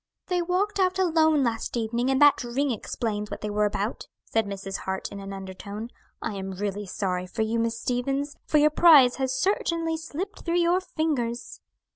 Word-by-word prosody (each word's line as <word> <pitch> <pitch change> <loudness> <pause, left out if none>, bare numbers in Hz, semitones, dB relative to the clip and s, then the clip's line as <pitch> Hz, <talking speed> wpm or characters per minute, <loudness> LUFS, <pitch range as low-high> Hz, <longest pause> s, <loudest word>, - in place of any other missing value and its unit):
"They 360 -1 +1
walked 380 +4 0
out 370 -1 +2
alone 320 -5 +3
last 230 0 -1
evening, 235 +2 0
and 265 0 +2
that 290 -3 +6
ring 265 +4 0
explains 210 -2 -3
what - - -6
they 210 - -3
were 210 0 +2
about," 205 +2 -2 0.2
said 225 -2 0
Mrs. 195 -1 -5
Hart, 190 0 -4
in 200 - -7
an 195 0 -7
undertone. 200 +4 -7 0.3
"I - - -2
am 195 -1 -5
really 200 +1 -3
sorry 180 -1 -2
for 220 - -2
you, 225 +1 0
Miss 230 0 -1
Stevens; 275 +4 -1
for 305 - +3
your 300 +1 +5
prize 295 -6 +7
has 265 -1 0
certainly 335 -3 0
slipped 335 +6 -6
through 340 0 0
your 350 +2 +3
fingers." 270 -10 -2
245 Hz, 185 wpm, -26 LUFS, 210-320 Hz, 0.3 s, prize